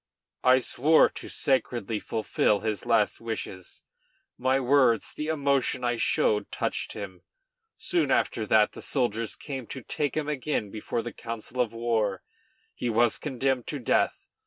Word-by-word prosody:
I 130 0 +6
swore 145 +5 +4
to - - -9
sacredly 120 -5 0
fulfil 105 -2 0
his 110 -2 -3
last 110 -3 +2
wishes. 110 -5 -6 0.5
My 130 +2 +1
words, 130 -4 +3
the 150 - -4
emotion 140 -4 +1
I 120 -1 +1
showed 445 - +1
touched - - -2
him. - - -7 0.6
Soon 345 -2 +1
after 110 -2 +1
that 110 0 +4
the - - -10
soldiers 115 -4 -1
came 135 -5 -6
to 130 - -7
take 145 +4 -2
him 150 -1 -1
again 140 -7 -2
before 110 +1 -3
the 120 - -6
council 115 +2 -4
of 115 -2 -1
war. 110 -4 0 0.5
He 120 - -3
was 115 +1 +2
condemned 130 -3 -1
to 150 - -3
death. 125 - +1
120 Hz, 150 wpm, -27 LUFS, 110-135 Hz, 0.6 s, I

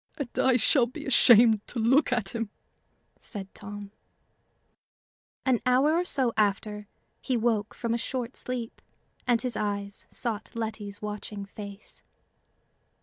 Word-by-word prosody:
"And 280 -5 -4
I 260 -2 +4
shall 245 +1 +4
be 250 - -9
ashamed 235 -4 +7
to - - -6
look 250 +6 +3
at 240 -6 +1
him!" 230 -1 -3 0.7
said 195 -4 -7
Tom. 205 0 -8 1.5
An 255 -3 +3
hour 260 +5 +4
or 345 +2 +1
so 255 -8 +1
after, 210 0 0 0.3
he 255 -3 0
woke 220 -2 0
from 235 -1 -2
a 235 - 0
short 250 0 -4
sleep, 245 -2 -5 0.5
and 240 -2 +4
his 250 -3 -2
eyes 200 -1 -3
sought 220 -3 -3
Letty's 215 -2 -5
watching 210 -1 -5
face. 200 0 -10
225 Hz, 135 wpm, -28 LUFS, 205-250 Hz, 1.5 s, ashamed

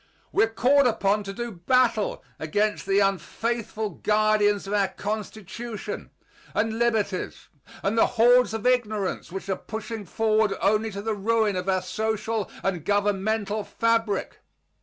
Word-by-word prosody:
We - - +4
are - - -7
called 260 +4 +4
upon 210 -2 +1
to 195 - -4
do 235 +4 -5
battle 220 +3 +1 0.2
against 205 +6 -1
the 195 0 +2
unfaithful 215 +3 -1
guardians 210 -1 +2
of 195 - -4
our 200 -2 +3
Constitution 215 +1 -5 0.5
and 225 +1 0
liberties 220 -5 -1 0.3
and 200 +3 +1
the 225 - +5
hordes 245 0 +5
of 225 - -5
ignorance 215 -8 0
which 190 +1 -6
are 190 - 0
pushing 220 +1 -6
forward 215 +1 +1
only 215 +2 +2
to 200 -1 -6
the 220 0 -1
ruin 215 0 +1
of 180 +1 -2
our 185 -1 +1
social 220 +1 -2
and 180 -5 -1
governmental 205 +1 0
fabric. 225 -2 0
215 Hz, 140 wpm, -25 LUFS, 200-225 Hz, 0.5 s, the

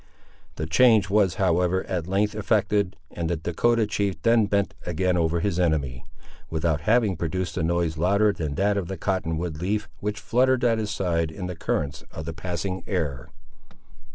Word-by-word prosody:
The 75 - -3
change 105 +2 +4
was, 100 -5 +3
however, 90 0 +2
at 90 -3 -3
length 100 +3 +1
effected, 105 -2 +1 0.2
and 85 -2 -3
the 85 - 0
Dahcotah 110 +8 +1
chief 100 -2 -1
then 115 -2 +4
bent 100 -3 0
again 90 +1 0
over 85 -1 +1
his 90 -2 0
enemy, 75 -6 0 0.4
without 80 -1 0
having 110 -4 +3
produced 85 +2 -3
a - - -1
noise 85 -1 0
louder 100 +4 +3
than 75 -6 -4
that 100 +3 +1
of 95 -4 -2
the 95 - -5
cotton 85 -3 -1
wood 80 -2 -4
leaf 105 +3 -1
which 105 +1 -3
fluttered 130 +3 +2
at 115 -2 +3
his 105 -1 -2
side 85 -6 0
in 90 +4 -6
the 90 0 -4
currents 70 -3 -2
of 80 -2 -7
the 80 - -4
passing 90 +2 -3
air. 75 - -2
90 Hz, 180 wpm, -25 LUFS, 80-105 Hz, 0.4 s, change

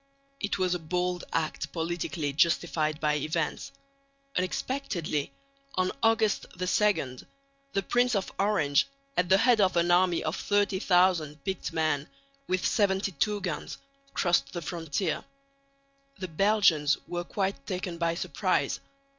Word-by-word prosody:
It 200 - -1
was 185 -1 +1
a 180 - -1
bold 180 +2 -2
act 160 -1 -2
politically 165 -3 -2
justified 155 -1 +1
by 150 -1 +1
events. 155 +2 -2 0.6
Unexpectedly, 180 - -2 0.4
on 185 0 +1
August 225 -2 +2
2, 180 -7 +1 0.6
the 195 - 0
Prince 245 +4 +2
of 195 - -1
Orange 195 - +3 0.3
at 180 0 +1
the 190 - +7
head 235 0 +4
of 185 -2 +3
an 170 +1 +3
army 175 -1 +3
of 155 +2 -1
30,000 185 -6 +2
picked 190 -2 -3
men 155 -2 0 0.4
with 185 0 0
72 200 0 +1
guns 180 -5 -4 0.4
crossed 170 -6 +2
the 175 - -4
frontier. 165 0 -2 0.9
The 185 -2 -5
Belgians 165 -5 +3
were 175 0 -3
quite 195 +2 -3
taken 180 -2 -4
by 170 -1 +1
surprise. - - 0
180 Hz, 125 wpm, -28 LUFS, 160-195 Hz, 0.9 s, the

